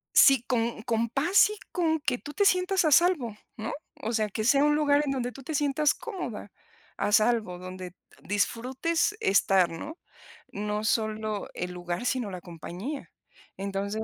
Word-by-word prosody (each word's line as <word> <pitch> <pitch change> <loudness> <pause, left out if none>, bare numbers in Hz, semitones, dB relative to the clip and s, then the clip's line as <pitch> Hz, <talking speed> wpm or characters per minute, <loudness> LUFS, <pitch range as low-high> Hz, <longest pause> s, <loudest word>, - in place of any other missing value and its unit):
Sí, 270 -4 +7
con 230 -3 -1
con 230 0 0
paz 340 - +4
y 425 - -6
con 320 -3 +1
que 285 -4 -1
tú 290 - -9
te 405 - +2
sientas 365 -1 +3
a 310 - +3
salvo, 295 - +3 0.2
¿no? 220 0 -4 0.3
O 225 +2 -2
sea, 215 -2 +1
que 215 +2 -3
sea 275 +5 +4
un 295 0 +4
lugar 295 -1 +3
en 285 - -1
donde 250 -2 -2
tú 270 - -11
te 315 - -5
sientas 290 +1 +2
cómoda 445 -7 -6 0.5
a 210 - -1
salvo 215 -5 +2
donde 185 0 -8 0.3
disfrutes 255 - 0
estar, 190 -2 +3
¿no? 295 - -7 0.5
No 210 +1 -3
solo 215 -1 -1
el 180 0 -4
lugar, 175 +5 -4
sino 250 -5 0
la 180 - -7
compañía 180 - -7 0.5
entonces 200 +2 -3
235 Hz, 165 wpm, -27 LUFS, 205-295 Hz, 0.5 s, Sí